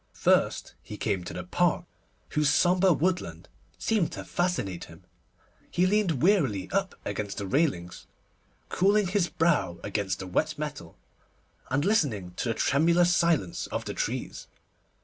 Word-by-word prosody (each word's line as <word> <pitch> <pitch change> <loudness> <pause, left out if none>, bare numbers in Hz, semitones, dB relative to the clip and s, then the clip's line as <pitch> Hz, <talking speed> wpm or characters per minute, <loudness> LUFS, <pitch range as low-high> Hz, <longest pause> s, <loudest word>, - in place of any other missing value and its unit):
First - - +2
he 105 - -9
came 100 -5 -1
to - - -6
the - - -4
Park, 175 -1 +1 0.4
whose 150 -1 +2
sombre 185 +1 +4
woodland 180 +3 -1 0.3
seemed 215 -7 0
to - - -7
fascinate 175 - -2
him. 80 +3 -15 0.7
He 180 - +2
leaned 185 -8 +1
wearily 135 - +2
up 195 -1 -1
against 100 0 -4
the 100 - -3
railings, 95 - -1 0.6
cooling 200 +2 +2
his 185 -1 0
brow 165 - +1
against 100 -1 -2
the 95 - -7
wet 155 - -1
metal, 150 -1 -6 0.7
and 135 +4 0
listening 135 - +1
to - - -2
the 115 - 0
tremulous 170 +4 +3
silence 165 - +1
of - - -4
the - - -4
trees. - - -4
155 Hz, 145 wpm, -27 LUFS, -, 0.7 s, sombre